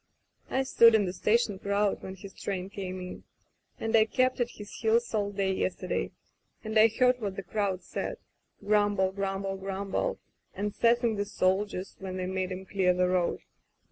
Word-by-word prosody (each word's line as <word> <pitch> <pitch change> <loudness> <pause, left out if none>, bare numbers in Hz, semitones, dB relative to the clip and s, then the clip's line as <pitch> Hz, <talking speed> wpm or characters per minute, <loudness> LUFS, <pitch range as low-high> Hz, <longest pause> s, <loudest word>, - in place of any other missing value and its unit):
"I 265 - +1
stood 230 -3 +6
in 210 -2 +3
the 180 - -3
station 210 0 +1
crowd 200 +1 0
when 190 - -7
his 190 +1 -11
train 190 -1 -4
came 190 -3 -5
in, 180 0 -8 0.6
and 225 0 0
I 220 -1 +6
kept 255 +3 +1
at 240 -1 +1
his 205 -3 -10
heels 230 +1 +1
all 205 -2 0
day 195 -1 0
yesterday, 90 - -2 0.5
and 220 0 -4
I 220 +1 +8
heard 250 +2 +2
what 200 -3 -3
the 195 - -5
crowd 190 -1 -1
said - - -4 0.2
— - - -23
grumble, 205 -2 +3
grumble, 195 0 -2
grumble, 195 - -2 0.4
and 205 +1 -2
sassing 235 -1 +2
the 205 - 0
soldiers 190 0 -1
when 185 -1 -5
they 185 - -2
made 185 0 -2
'em 185 +1 -5
clear 185 -2 +2
the 180 0 +2
road. 180 -1 +1
200 Hz, 180 wpm, -29 LUFS, 190-220 Hz, 0.6 s, I